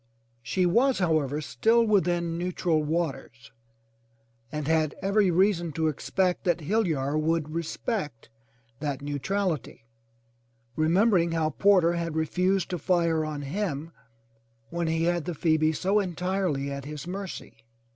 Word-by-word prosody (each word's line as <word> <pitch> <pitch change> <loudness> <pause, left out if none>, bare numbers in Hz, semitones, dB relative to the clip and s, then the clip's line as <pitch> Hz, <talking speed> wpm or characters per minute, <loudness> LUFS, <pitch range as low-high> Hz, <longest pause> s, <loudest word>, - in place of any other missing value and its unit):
She 180 +9 0
was, 240 +9 +3
however, 155 -5 +1
still 230 +9 +2
within 175 -5 +1
neutral 175 -2 0
waters 150 -7 -3 1.0
and 150 -2 -4
had 155 -2 +1
every 200 0 +2
reason 175 -1 +2
to 160 +1 +1
expect 180 +5 -1
that 175 -3 +1
Hill 210 +7 +1
yar 140 -2 -1
would 155 -1 0
respect 165 - -3 0.5
that 145 -2 -3
neutrality, 145 - -2 0.9
remembering 170 +2 +3
how 160 -1 0
Porter 185 -3 +4
had 170 -2 -3
refused 180 +5 0
to 180 - -2
fire 170 -1 +1
on 150 -2 -4
him 165 -1 -3 0.8
when 170 0 -1
he 160 0 0
had 175 -1 0
the 175 -2 -3
Phoebe 155 0 +2
so 190 +6 +1
entirely 180 -6 -1
at 140 -1 -6
his 150 0 -7
mercy. 190 - -7
170 Hz, 130 wpm, -27 LUFS, 155-185 Hz, 1.0 s, Porter